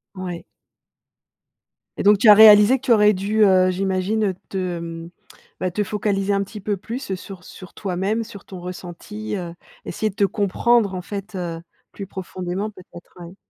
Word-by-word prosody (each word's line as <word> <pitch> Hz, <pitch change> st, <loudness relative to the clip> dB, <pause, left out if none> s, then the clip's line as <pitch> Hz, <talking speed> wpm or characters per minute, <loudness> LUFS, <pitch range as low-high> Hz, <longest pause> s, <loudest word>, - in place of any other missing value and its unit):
Ouais. 180 Hz, -2 st, -6 dB, 1.5 s
Et -, -, -3 dB
donc, 205 Hz, 0 st, +5 dB
tu 220 Hz, -, +5 dB
as -, -, +12 dB
réalisé 215 Hz, +3 st, +8 dB
que -, -, -18 dB
tu 250 Hz, -, +1 dB
aurais 210 Hz, -1 st, +5 dB
dû, 210 Hz, +3 st, +1 dB
heu, 185 Hz, -2 st, +4 dB
j'imagine 190 Hz, +2 st, -1 dB
te, 195 Hz, -, -5 dB, 0.2 s
hem, 165 Hz, 0 st, -7 dB, 0.5 s
bah, 185 Hz, -, -2 dB
te 210 Hz, +4 st, -1 dB
focaliser 200 Hz, -1 st, -1 dB
un 200 Hz, 0 st, +1 dB
petit 210 Hz, +1 st, -10 dB
peu 205 Hz, 0 st, -2 dB
plus 230 Hz, 0 st, -5 dB
sur 185 Hz, -1 st, -11 dB
sur 185 Hz, -1 st, -13 dB
toi-même, 200 Hz, +4 st, -2 dB
sur 210 Hz, -4 st, -12 dB
ton 185 Hz, -2 st, -10 dB
ressenti, 180 Hz, +4 st, -7 dB
heu, 175 Hz, -3 st, -5 dB, 0.3 s
essayer 215 Hz, +5 st, -3 dB
de 190 Hz, -, -26 dB
te 200 Hz, -, +1 dB
comprendre, 205 Hz, +1 st, +1 dB
en 180 Hz, -, -4 dB
fait, 200 Hz, +2 st, -7 dB
heu, 170 Hz, -2 st, -4 dB, 0.3 s
plus 200 Hz, -, -8 dB
profondément, 190 Hz, +1 st, -5 dB
peut-être, 180 Hz, -3 st, -15 dB
ouais. 175 Hz, +2 st, -11 dB
195 Hz, 175 wpm, -21 LUFS, 180-210 Hz, 1.5 s, as